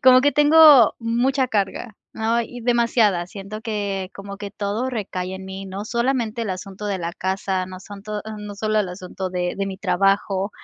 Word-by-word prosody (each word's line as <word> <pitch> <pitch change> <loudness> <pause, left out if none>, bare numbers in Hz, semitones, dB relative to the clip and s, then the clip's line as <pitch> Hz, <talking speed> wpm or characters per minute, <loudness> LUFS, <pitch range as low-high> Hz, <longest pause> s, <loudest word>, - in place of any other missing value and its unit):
como 255 0 +8
que 285 +2 +3
tengo 295 -5 +7
mucha 250 +3 +1
carga, 210 +1 -2 0.2
¿no?, 230 +2 0
y 245 +2 -9
demasiada, 230 -6 +2
siento 205 +3 -8
que 200 -4 -3
como 200 0 -8
que 205 0 -7
todo 210 +5 -2
recae 190 -5 -4
en 190 0 -9
mí, 190 +1 -7
¿no?, 195 +2 -6
solamente 235 -1 0
el 210 - -2
asunto 190 +2 -7
de 200 -2 -1
la 170 0 -4
casa, 190 0 -1
no 185 0 -9
son 200 0 -11
to 210 0 -4 0.2
no 210 -1 -7
solo 215 +1 0
el 190 - -2
asunto 185 0 -6
de 180 -1 -2
de 195 - -1
mi 190 -1 -6
trabajo, 195 +1 +1
205 Hz, 190 wpm, -22 LUFS, 190-230 Hz, 0.2 s, como